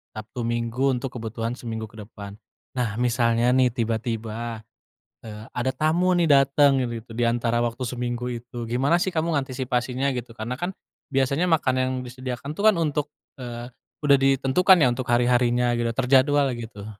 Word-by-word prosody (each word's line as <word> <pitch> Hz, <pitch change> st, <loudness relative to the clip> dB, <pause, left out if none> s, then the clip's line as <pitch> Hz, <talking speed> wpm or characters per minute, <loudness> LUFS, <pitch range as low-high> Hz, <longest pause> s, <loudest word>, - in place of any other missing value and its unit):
Sabtu 110 Hz, +3 st, -6 dB
Minggu 120 Hz, +3 st, 0 dB
untuk 125 Hz, +1 st, -4 dB
kebutuhan 115 Hz, 0 st, -4 dB
seminggu 110 Hz, -2 st, -5 dB
ke 110 Hz, -, -13 dB
depan. 100 Hz, -1 st, -10 dB, 0.4 s
Nah 115 Hz, -4 st, -1 dB
misalnya 120 Hz, 0 st, +2 dB
nih 130 Hz, -1 st, +5 dB
tiba-tiba, 115 Hz, -1 st, -3 dB, 0.6 s
eee, 105 Hz, -1 st, -8 dB
ada 125 Hz, +1 st, 0 dB
tamu 160 Hz, +6 st, +1 dB
nih 175 Hz, -1 st, +2 dB
dateng, 140 Hz, -1 st, +4 dB
itu 120 Hz, -2 st, -3 dB
itu 120 Hz, -, -17 dB
diantara 120 Hz, 0 st, +1 dB
waktu 120 Hz, +2 st, -2 dB
seminggu 120 Hz, 0 st, -3 dB
itu, 120 Hz, 0 st, -7 dB
gimana 135 Hz, +8 st, +2 dB
sih 190 Hz, -, 0 dB
kamu 165 Hz, +1 st, 0 dB
antisipasinya 130 Hz, 0 st, -1 dB
gitu, 120 Hz, -1 st, -5 dB
karena 115 Hz, +2 st, -4 dB
kan 175 Hz, +2 st, -2 dB, 0.4 s
biasanya 140 Hz, +6 st, +1 dB
makanan 130 Hz, -6 st, +2 dB
yang 130 Hz, -, -2 dB
disediakan 130 Hz, +2 st, -6 dB
itu 180 Hz, -, -5 dB
kan 215 Hz, -1 st, +5 dB
untuk, 150 Hz, -3 st, -1 dB, 0.3 s
eee, 120 Hz, -1 st, -6 dB, 0.3 s
udah 145 Hz, -2 st, +5 dB
ditentukan 135 Hz, +7 st, +4 dB
ya 130 Hz, -, +5 dB
untuk 130 Hz, +1 st, -5 dB
hari-harinya 120 Hz, 0 st, +3 dB
gitu, 120 Hz, 0 st, 0 dB
terjadwal 135 Hz, +3 st, +3 dB
gitu. 115 Hz, -3 st, -8 dB
125 Hz, 160 wpm, -24 LUFS, 115-135 Hz, 0.6 s, nih